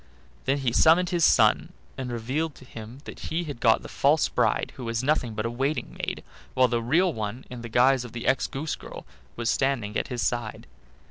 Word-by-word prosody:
Then 135 +2 +2
he 130 -4 -1
summoned 170 +6 +5
his 175 -2 +1
son, - - +4 0.2
and 130 -2 -5
revealed 135 +7 -2
to 130 - -14
him 115 +2 -10
that - - -9
he 165 +2 -1
had 145 -7 -7
got - - +3
the - - -7
false 60 - +2
bride, - - 0
who 125 - -7
was 115 +1 -2
nothing 130 -6 0
but 110 +1 -2
a 115 - -1
waiting 135 +5 -2
maid, - - -4 0.3
while 130 0 +5
the 120 -1 0
real 165 +9 +2
one, 110 +3 -5
in 125 -2 -7
the 115 - -7
guise 125 +2 +4
of 120 - -9
the 115 0 -6
ex 135 - +2
goose 150 +3 -3
girl, - - -10 0.3
was 120 -1 -3
standing 120 -6 0
at - - -1
his 125 -3 -3
side. 120 -3 -2
125 Hz, 215 wpm, -26 LUFS, 115-140 Hz, 0.3 s, summoned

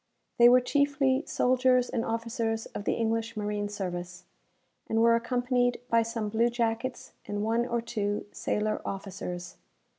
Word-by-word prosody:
They 240 0 +9
were 250 +1 +6
chiefly 280 0 +2
soldiers 255 0 +3
and 230 - -2
officers 225 -1 -2
of 205 - -7
the - - +2
English 225 -1 -1
marine 210 -1 -2
service, 180 -3 -5 0.7
and 225 - +1
were 230 0 +5
accompanied 245 +1 +1
by 230 0 +5
some 225 -2 -3
blue 230 +3 +2
jackets 235 +1 -2 0.2
and 205 0 -2
one 230 +2 +1
or 235 -1 -1
two 210 -3 -2
sailor 215 0 -1
officers. 180 -2 -6
230 Hz, 145 wpm, -28 LUFS, 210-245 Hz, 0.7 s, They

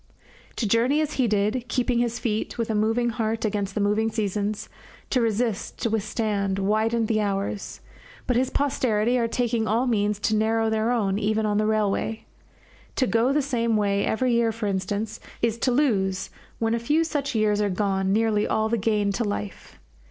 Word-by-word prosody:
To 225 - -1
journey 240 +8 +3
as 305 -1 -1
he 255 -3 +1
did, 215 +3 0
keeping 245 0 0
his 240 0 0
feet, 220 -2 -2
with 230 -1 -1
a - - 0
moving 225 +3 +1
heart 225 -1 -1
against 205 -2 -2
the - - 0
moving 210 +2 +2
seasons, 210 -1 -2 0.4
to 255 - +2
resist, 225 -1 -1
to 230 - +1
withstand, 210 -2 -1
widened 220 +3 +1
the 215 -1 +1
hours; 200 0 -3 0.4
but 250 - 0
his 255 +2 +2
posterity 250 -4 +1
are 230 - +1
taking 230 -2 0
all 230 +4 +1
means 210 -4 +1
to 215 - +1
narrow 220 +1 +1
their 220 +1 +1
own, 205 -5 +1
even 215 +1 0
on 210 0 +1
the 215 - +1
railway. 215 +1 0 0.7
To 260 - +2
go 230 +2 +2
the 290 0 +2
same 235 -5 0
way 200 -1 +1
every 245 +2 +1
year, 235 -1 +2
for 225 0 -5
instance, 205 +3 -2 0.2
is 230 0 0
to 255 - +1
lose, 200 -9 +1 0.3
when 225 0 0
a 235 - +1
few 295 +8 +2
such 285 -5 -2
years 210 -1 +2
are 205 - +1
gone, 190 0 0
nearly 215 0 +2
all 220 0 +1
the 230 0 0
gain 210 -1 +1
to 215 +4 -1
life. 205 -1 -5
220 Hz, 190 wpm, -25 LUFS, 210-235 Hz, 0.7 s, journey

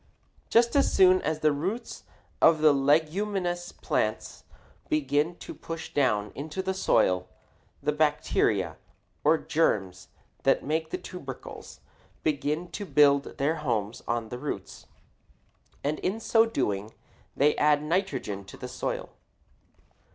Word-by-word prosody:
Just 235 +2 +4
as 280 - +4
soon 185 -1 +5
as 155 0 -2
the 155 - +4
roots 190 +12 -4 0.4
of 160 -2 +5
the 155 -1 +6
leguminous 175 +6 +1
plants - - -2 0.4
begin 170 - +1
to - - -9
push 165 -1 -7
down 105 -8 +1
into 155 +7 -5
the 190 0 -1
soil, 90 - +2 0.6
the - - +2
bacteria, 150 0 +1 0.5
or 155 +2 +5
germs 95 - 0 0.3
that - - +2
make 160 +2 -1
the - - -3
tubercles, 140 -8 -9 0.4
begin 155 +3 -1
to 205 - -5
build 140 -4 +3
their 150 +4 +1
homes 115 -7 -2
on 115 -1 -1
the 125 - -6
roots, 145 +2 -6 1.0
and 150 +2 -1
in 200 +4 -2
so 225 0 +3
doing 105 - -2 0.4
they 145 +2 +4
add 150 0 +3
nitrogen 160 - -2
to - - -12
the 125 - -6
soil. 125 +1 -4
150 Hz, 130 wpm, -27 LUFS, 135-175 Hz, 1.0 s, the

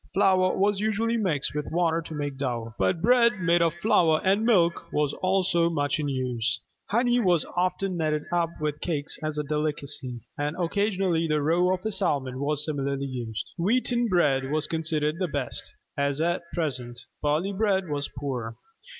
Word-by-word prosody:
Flour 185 -2 +3
was 200 0 +2
usually 220 +2 0
mixed 180 -11 0
with 150 0 -3
water 165 -1 +1
to 160 -1 -8
make 145 -2 -3
dough: 120 -4 -3
but 170 -3 +1
bread 235 -2 +4
made 170 -1 +3
of 165 -1 +2
flour 165 -7 +4
and 195 +3 +3
milk 180 -8 +2
was 150 -1 +1
also 185 -3 +2
much 145 -2 0
in 150 - -1
use. 125 -3 -1 0.3
Honey 240 +2 +2
was 180 -7 +2
often 185 +1 0
kneaded 155 -2 0
up 170 -1 +1
with 150 -1 -2
cakes 155 -3 -3
as 155 -1 -3
a 150 - 0
delicacy: 145 -4 -2 0.2
and 145 +2 -1
occasionally 185 -2 0
the 155 -1 +1
roe 175 +4 +3
of 185 +1 -2
a 220 - 0
salmon 130 -8 0
was 150 +1 0
similarly 140 -2 -2
used. 120 -5 -5
Wheaten 240 +5 +2
bread 140 -9 +2
was 155 +1 +1
considered 160 -1 -1
the 185 - 0
best, 145 -5 -4 0.2
as 140 0 0
at 170 +2 +1
present: 125 -7 -2 0.2
barley 155 +7 0
bread 190 -2 +1
was 145 -1 -2
poor. 125 -5 -4
160 Hz, 170 wpm, -26 LUFS, 145-185 Hz, 0.3 s, bread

